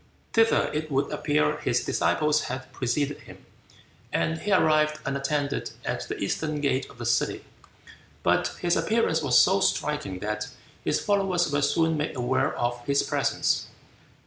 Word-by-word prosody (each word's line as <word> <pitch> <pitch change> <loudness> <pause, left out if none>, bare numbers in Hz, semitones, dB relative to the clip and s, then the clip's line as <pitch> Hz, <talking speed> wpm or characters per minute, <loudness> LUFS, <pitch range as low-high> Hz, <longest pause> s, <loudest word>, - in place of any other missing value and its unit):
Thither 225 0 +3
it 155 +1 -2
would 135 -1 0
appear 145 - +1
his - - 0
disciples 150 0 +1
had 130 +1 -6
preceded 140 +3 -1
him, - - -15 0.7
and 160 0 0
he 210 - -3
arrived 155 -4 +3
unattended 140 +1 -1 0.2
at - - -3
the - - -4
eastern 150 +9 -2
gate 140 -2 0
of - - -15
the 120 - -6
city. 120 +1 0 0.8
But - - +3
his 175 0 +2
appearance 220 -8 +1
was 130 -4 +5
so 190 +2 +4
striking 150 - 0
that 105 +2 -3 0.4
his - - +1
followers 190 -5 +1
were 145 0 +1
soon 160 +2 +2
made 150 0 -2
aware 130 +3 0
of 120 0 -2
his 140 +1 +2
presence. - - 0
145 Hz, 150 wpm, -26 LUFS, 130-160 Hz, 0.8 s, was